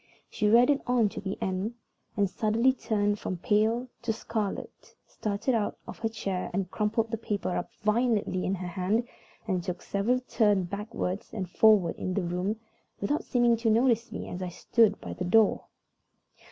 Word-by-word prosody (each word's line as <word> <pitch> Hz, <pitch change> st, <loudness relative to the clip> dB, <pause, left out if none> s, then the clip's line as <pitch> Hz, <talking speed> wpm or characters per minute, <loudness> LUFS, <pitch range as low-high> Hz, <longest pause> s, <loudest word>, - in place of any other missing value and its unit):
She 210 Hz, -1 st, +1 dB
read 250 Hz, +5 st, +5 dB
on 240 Hz, -4 st, +3 dB
to -, -, -7 dB
the 195 Hz, -1 st, -4 dB
end, 190 Hz, +5 st, -2 dB, 0.4 s
and 200 Hz, -1 st, +3 dB
suddenly 225 Hz, +6 st, +2 dB
turned 205 Hz, -4 st, 0 dB
from 185 Hz, -, -3 dB
pale 220 Hz, +6 st, +1 dB
to 235 Hz, -1 st, -1 dB
scarlet, 220 Hz, -2 st, -4 dB
started 210 Hz, +5 st, -2 dB
out 220 Hz, -3 st, 0 dB
of -, -, -8 dB
her 225 Hz, -, -1 dB
chair, 195 Hz, -4 st, -3 dB, 0.2 s
crumpled 225 Hz, +1 st, 0 dB
the 225 Hz, -, -2 dB
letter 200 Hz, -3 st, -1 dB
up -, -, -3 dB
violently 215 Hz, -4 st, +1 dB
in 190 Hz, -, 0 dB
her 180 Hz, -1 st, -5 dB
hand, 190 Hz, +7 st, 0 dB, 0.4 s
and 185 Hz, -4 st, 0 dB
took 180 Hz, 0 st, -5 dB
several 220 Hz, +6 st, +1 dB
turns 210 Hz, -6 st, +2 dB
backward 200 Hz, -1 st, -3 dB
and 195 Hz, -5 st, -3 dB
forward 195 Hz, -2 st, +4 dB
in 185 Hz, 0 st, -3 dB
the 200 Hz, -, 0 dB
room, 180 Hz, +5 st, -2 dB, 0.4 s
without 290 Hz, +10 st, 0 dB
seeming 240 Hz, -2 st, +3 dB
to 230 Hz, 0 st, +1 dB
notice 230 Hz, +1 st, +3 dB
me -, -, -5 dB
as 180 Hz, -, -6 dB
I 180 Hz, -, -3 dB
stood 215 Hz, +4 st, +2 dB
by -, -, -6 dB
the 180 Hz, -, -4 dB
door. 210 Hz, +4 st, +3 dB
210 Hz, 170 wpm, -28 LUFS, 190-230 Hz, 0.4 s, read